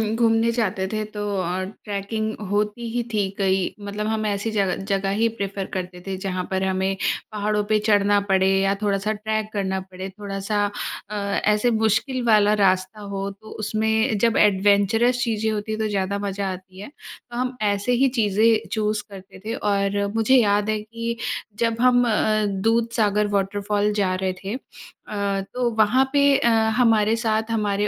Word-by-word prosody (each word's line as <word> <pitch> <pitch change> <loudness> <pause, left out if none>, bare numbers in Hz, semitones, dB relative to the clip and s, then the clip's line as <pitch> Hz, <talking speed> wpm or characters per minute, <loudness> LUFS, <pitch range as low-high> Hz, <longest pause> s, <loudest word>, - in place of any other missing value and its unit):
घूमने 225 0 +3
जाते 200 -5 -1
थे 215 +2 -2
तो 210 - -4 0.2
और 185 +1 -2 0.2
ट्रैकिंग 215 +2 -3 0.2
होती 210 +3 -1
ही 245 - +1
थी 205 -2 +1
कई 190 -1 +2 0.3
मतलब 210 +1 -3
हम 220 0 -1
ऐसी 205 +1 -1
जगह 200 -3 +1
जगह 195 -1 0
ही 230 - +4
प्रेफ़र 195 -1 -3
करते 180 -1 -5
थे 195 - -2
जहाँ 185 -1 -2
पर 190 0 0
हमें 190 0 0 0.4
पहाड़ों 210 0 0
पे 215 -1 +3
चढ़ना 205 -1 +4
पड़े 190 0 +3
या 195 0 +2
थोड़ा-सा 205 +1 0
ट्रैक 215 0 -2
करना 190 -2 -1
पड़े। 185 0 -8
थोड़ा-सा 200 +1 -3 0.5
अ, 210 - -5
ऐसे 210 +3 +1
मुश्किल 225 +4 +1
वाला 210 -2 +5
रास्ता 190 +2 +1
हो 195 0 -2
तो 210 +2 -15 0.2
उसमें 220 +1 +1
जब 230 -1 +3
एडवेंचर्स 205 +5 +3
चीज़ें 220 -2 0
होती 215 0 -3
हैं 215 - -3
तो 215 - +1
ज़्यादा 200 -1 -1
मज़ा 200 -1 -2
आती 185 0 -10
है। 210 - -8 0.4
तो 240 - -5
हम 250 +1 -2 0.2
ऐसे 200 +4 -1
ही 270 - +5
चीज़ें 220 +2 +3
चूज़ 215 -1 0
करते 195 -1 -12
थे 225 - -2 0.2
और 200 0 +1
मुझे 225 +4 +4
याद 210 -3 +3
है 215 0 0
कि 230 +2 -5 0.4
जब 230 0 0
हम 250 -1 +5
अ, 215 0 +2
दूधसागर 210 +1 +1
वॉटरफॉल 205 +1 0
जा 195 -3 +1
रहे 185 0 -1
थे 200 +4 -3 0.5
अ, 200 -1 -1
तो 250 -1 0
वहाँ 240 +5 +3
पे 285 - +4 0.2
अ, 235 - +2 0.3
हमारे 225 -3 +4
साथ 220 -1 -1
हमारे 210 -2 0
210 Hz, 170 wpm, -23 LUFS, 195-220 Hz, 0.5 s, वाला